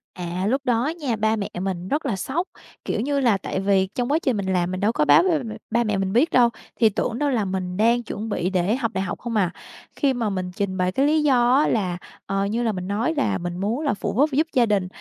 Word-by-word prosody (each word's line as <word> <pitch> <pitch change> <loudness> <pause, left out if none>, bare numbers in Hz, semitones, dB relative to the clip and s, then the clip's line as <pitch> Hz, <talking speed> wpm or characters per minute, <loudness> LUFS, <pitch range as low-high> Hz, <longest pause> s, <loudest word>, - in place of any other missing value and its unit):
À, 180 +1 -3
lúc 265 +5 +1
đó 245 +1 +1
nha, 265 -7 -1
ba 220 +1 +1
mẹ 205 -2 -3
mình 185 -1 -3
rất 295 +6 -1
là 240 -7 0
sốc, 295 - -2 0.4
kiểu - - -1
như 280 +3 0
là, 235 -7 +3
tại 190 - -4
vì 195 -1 +2
trong 245 +2 -1
quá 310 - +3
trình 250 -6 +1
mình 190 -1 -1
làm 180 -1 0
mình 185 - -3
đâu 210 +3 +2
có 150 -9 +1
báo 145 - +6
với 355 -4 +2
ba - - -6
mẹ 220 -2 -6 0.2
ba 235 +1 +2
mẹ 210 -3 -1
mình 195 0 -1
biết 265 +9 +4
đâu, 245 -2 +5 0.3
thì 225 - +6
tưởng 230 +3 -2
đâu 290 - +1
là 235 -6 0
mình 185 -1 -3
đang 235 +3 +3
chuẩn 220 0 -5
bị 180 -3 -1
để 190 +3 +1
học 235 -4 -2
đại 190 - -1
học 180 - -4
không 235 -1 -4
à. 185 -5 +2 0.4
Khi 280 -3 +1
mà 235 -4 -1
mình 185 -2 -3
trình 195 -2 -2
bày 180 -1 +1
cái 270 +8 +1
lý 305 +1 +3
do 250 -4 +4
á 290 - +4
là, 185 -5 0 0.3
ờ, 195 0 -1
như 225 +4 -1
là 225 - +1
mình 185 -2 -5
nói 220 +10 0
là 285 - +1
mình 175 -1 -5
muốn 215 +9 -1
là 290 - +1
phụ 205 - -3
giúp 285 +7 +3
giúp 310 +5 +1
gia 245 -2 +4
đình. 200 -4 +1
215 Hz, 280 wpm, -23 LUFS, 190-250 Hz, 0.4 s, báo